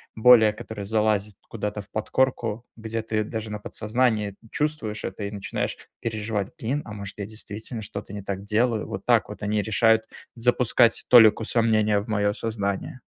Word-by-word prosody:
более 110 -2 +7
который 105 -1 -7
залазит 105 -1 +1
куда-то 105 -1 -4
в 105 - -18
подкорку, 115 0 -1
где 115 0 -4
ты 110 -1 -1
даже 110 0 -5
на 105 - -4
подсознании 110 -2 0 0.2
чувствуешь 150 -8 -2
это 95 +2 -5
и 100 - -3
начинаешь 100 -2 -3 0.2
переживать: 110 -3 -2
"Блин, 135 +6 -2
а 105 - -8
может, 100 -1 -7
я 100 - -4
действительно 110 +2 -8
что-то 100 0 -7
не 100 - -5
так 100 0 -5
делаю?" 110 +1 +1
Вот - - -6
так - - +4
вот - - -9
они 105 0 +1
решают 110 +1 +3 0.3
запускать 120 -1 +3
толику 115 -2 +7
сомнения 110 -2 +2
в 105 - -7
мое 105 -2 +1
сознание. 105 +2 -3
110 Hz, 165 wpm, -25 LUFS, 105-115 Hz, 0.3 s, более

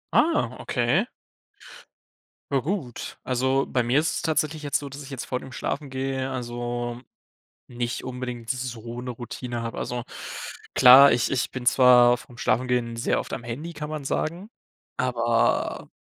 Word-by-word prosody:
Ah, 305 - +3
okay. 130 - +1 1.4
Ja 135 - +3
gut. 145 - -4
Also, 130 +2 +1
bei 125 -2 +1
mir 125 +4 +3
ist 160 - 0
es - - -3
tatsächlich 155 -2 0
jetzt 145 -1 +1
so, 145 - -7
dass 140 +2 -8
ich 140 - -9
jetzt 135 -4 -5
vor 125 - -2
dem 130 - -11
Schlafen 140 +3 -3
gehen, 130 0 -2
also 120 -1 -4 0.7
nicht 120 0 -3
unbedingt 125 -2 -6
so 120 -2 -4
'ne 125 0 -4
Routine 120 0 -6
habe. 115 0 -5
Also, 120 -1 -3 0.7
klar, 130 +2 +9
ich 120 -1 +1
ich 135 -1 0
bin 130 -2 -6
zwar 125 -1 +6
vorm 125 -1 -15
Schlafengehen 120 0 0
sehr 115 - 0
oft - - -6
am 120 - -4
Handy, 140 +9 -6
kann 150 -1 -6
man 155 -2 -4
sagen, 170 +8 -2 0.5
aber 120 -2 +1
125 Hz, 155 wpm, -25 LUFS, 120-140 Hz, 1.4 s, klar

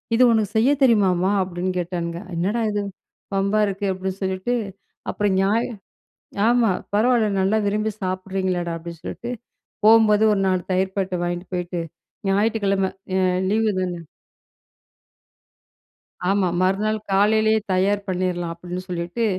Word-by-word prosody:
"இது 250 - +5
உனக்கு 215 -3 +1
செய்ய 235 +6 +4
தெரியுமாமா" 190 -7 +3
அப்டின்னு 185 0 -2
கேட்டானுங்க 170 -1 -3 0.2
"என்னடா 200 +7 0
இது 205 0 -1 0.5
வம்பா 200 +2 +2
இருக்கு," 195 0 -3
அப்டின்னு 190 +1 -5
சொல்லிட்டு 190 +5 -1 0.6
அப்புறம் 205 -2 0
ஞாய 210 +4 +2 0.8
ஆமா, 235 -3 +4 0.2
"பரவால்ல 230 0 +3
நல்லா 195 +3 +2
விரும்பி 215 +2 0
சாப்பிடுறீங்களேடா" 185 -2 -2
அப்டின்னு 165 -1 -9
சொல்ட்டு 240 - -5 0.5
போம்போது 220 -1 +6
ஒரு 195 - 0
4 185 -1 +1
தயிர் 190 +1 0
பாக்கெட்ட 190 -2 -1
வாங்கிட்டு 175 +2 -4
போயிட்டு, 175 -1 -3 0.5
ஞாயிற்றுக்கிழமை 200 -1 +1 0.3
அ 185 -1 +2
லீவு 220 +1 +2
தானே! 180 -2 -3 2.3
ஆமா, 195 -2 +2
மறுநாள் 205 +4 +1
"காலையிலேயே 215 +2 +3
தயார் 200 +2 +1
பண்ணிர்லாம்" 180 -2 -1
அப்டின்னு 180 +2 -6
சொல்லிட்டு, 175 +6 -2
195 Hz, 120 wpm, -22 LUFS, 180-215 Hz, 2.3 s, போம்போது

